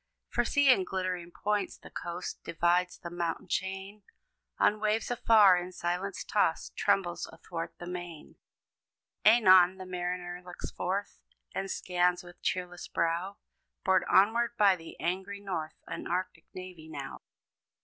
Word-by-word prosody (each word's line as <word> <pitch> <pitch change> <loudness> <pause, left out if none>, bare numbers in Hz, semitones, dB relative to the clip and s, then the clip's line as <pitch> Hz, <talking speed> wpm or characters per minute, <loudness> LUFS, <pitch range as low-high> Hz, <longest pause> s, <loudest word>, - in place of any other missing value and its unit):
For - - +1
see! 285 -2 +4
in 195 -7 +4
glittering 185 -2 -3
points, 205 +2 -2
the - - -14
coast 175 +1 -5
Divides; 175 +2 +1
the 170 -2 -8
mountain 175 +1 -3
chain, 190 +3 -3 0.6
On 210 - +3
waves 215 +2 0
afar 215 -6 +6
in 180 +1 -6
silence 180 +3 -3
tossed, - - 0
Trembles 175 -3 0
athwart 165 0 -6
the 175 - -8
main. 175 -3 -7 0.9
Anon, 190 -5 +7
the 185 - -8
mariner 180 0 -4
looks 180 -1 -8
forth, 195 +3 -3 0.3
And 195 0 -3
scans 180 -1 +1
with 175 0 -14
cheerless 180 -1 -3
brow, 170 +4 -1 0.5
Borne 190 -1 +4
onward 235 +4 +3
by 200 -2 +6
the 165 -2 -12
angry 190 +4 -2
North, 170 -6 -4
An 165 - -6
arctic 175 -2 -3
navy 180 -4 -9
now. 140 -3 -7
180 Hz, 140 wpm, -30 LUFS, 175-195 Hz, 0.9 s, Anon